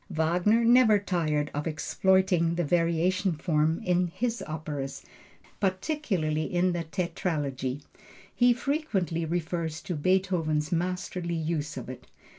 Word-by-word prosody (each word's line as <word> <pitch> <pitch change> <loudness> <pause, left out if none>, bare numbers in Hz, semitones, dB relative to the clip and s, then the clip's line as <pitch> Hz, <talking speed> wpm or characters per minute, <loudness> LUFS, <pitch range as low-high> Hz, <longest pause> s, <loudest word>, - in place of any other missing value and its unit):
Wagner 175 +9 +2
never 235 -3 +6
tired 155 -7 -1
of 145 +2 -3
exploiting 170 +1 +2
the 175 - 0
variation 175 +3 +1
form 155 0 +1
in 180 0 +2
his 230 +7 -2
operas, 150 -3 -5 0.6
particularly 185 - -1
in 180 +1 +2
the 170 -1 -3
Tetralogy. 145 -6 -2 0.5
He 245 0 +4
frequently 235 - -1
refers 165 -1 -2
to 185 - -3
Beethoven's 165 -2 +1
masterly 175 0 -2
use 155 -2 -2
of 125 - -6
it. 130 0 -9
170 Hz, 115 wpm, -28 LUFS, 155-185 Hz, 0.6 s, never